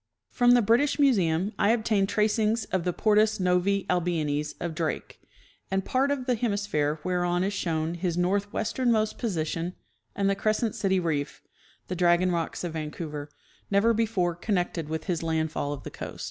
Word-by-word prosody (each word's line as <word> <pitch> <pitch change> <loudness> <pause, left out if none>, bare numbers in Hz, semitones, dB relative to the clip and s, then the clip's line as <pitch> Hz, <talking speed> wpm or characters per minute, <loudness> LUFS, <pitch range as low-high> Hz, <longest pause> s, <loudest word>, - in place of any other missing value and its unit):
From 245 -1 +4
the 240 - +4
British 235 +7 +3
Museum 200 - +2
I 200 - +3
obtained 220 -4 +2
tracings 215 +1 +1
of 185 -2 0
the 180 - +1
Portus 215 +2 +2
Novse 185 +2 +1
Albionis 155 -4 -1
of 170 -2 -3
Drake, 160 0 -4 0.5
and 190 0 -1
part 265 +2 +1
of 280 -3 -1
the 250 - +2
hemisphere 200 -10 -1
whereon 175 0 0
is 200 +2 -1
shown 165 -4 -1
his 175 -1 -2
northwesternmost 215 +4 0
position 170 -4 -2 0.4
and 200 -1 +1
the 195 - +3
Crescent 215 +2 0
City 190 -2 +1
reef 150 -4 -2 0.4
(the 185 - -3
Dragon 175 +1 +3
rocks 170 0 -2
of 170 -2 -3
Vancouver), 150 -1 -5 0.4
never 205 +4 +3
before 210 -6 +1
connected 175 -3 -2
with 160 0 -3
his 170 -3 -2
landfall 160 -3 -1
of 145 -3 -6
the - - -7
coast. - - -8
185 Hz, 160 wpm, -27 LUFS, 165-215 Hz, 0.5 s, From